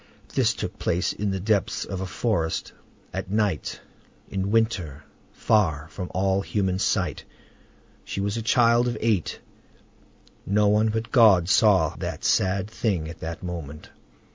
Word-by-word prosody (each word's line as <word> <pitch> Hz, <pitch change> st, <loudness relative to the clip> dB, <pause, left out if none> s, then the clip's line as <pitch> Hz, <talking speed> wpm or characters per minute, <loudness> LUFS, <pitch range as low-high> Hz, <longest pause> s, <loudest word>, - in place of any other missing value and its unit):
This -, -, +2 dB
took -, -, -5 dB
place 85 Hz, +1 st, 0 dB
in 105 Hz, 0 st, -2 dB
the 95 Hz, -1 st, -2 dB
depths 100 Hz, 0 st, 0 dB
of 95 Hz, -, -5 dB
a 95 Hz, -, -3 dB
forest, 85 Hz, -2 st, -1 dB, 0.4 s
at -, -, -4 dB
night, 105 Hz, -6 st, -1 dB, 0.5 s
in 95 Hz, 0 st, -2 dB
winter, 100 Hz, -, 0 dB, 0.3 s
far 80 Hz, -8 st, +1 dB
from 90 Hz, +2 st, -6 dB
all 95 Hz, +1 st, +1 dB
human 95 Hz, -2 st, -1 dB
sight; -, -, 0 dB, 0.8 s
she -, -, -5 dB
was 100 Hz, +1 st, -1 dB
a 115 Hz, -, -2 dB
child 120 Hz, +1 st, +3 dB
of 120 Hz, -2 st, -2 dB
eight: 110 Hz, -7 st, 0 dB, 1.0 s
no 105 Hz, +1 st, +2 dB
one 105 Hz, +2 st, +3 dB
but 110 Hz, +1 st, -3 dB
God 105 Hz, -9 st, +6 dB
saw 95 Hz, -7 st, +4 dB
that -, -, -5 dB
sad 95 Hz, +1 st, +2 dB
thing 100 Hz, -7 st, -2 dB
at 80 Hz, -, -10 dB
the 80 Hz, 0 st, -5 dB
moment. 75 Hz, -4 st, -7 dB
100 Hz, 145 wpm, -25 LUFS, 90-110 Hz, 1.0 s, God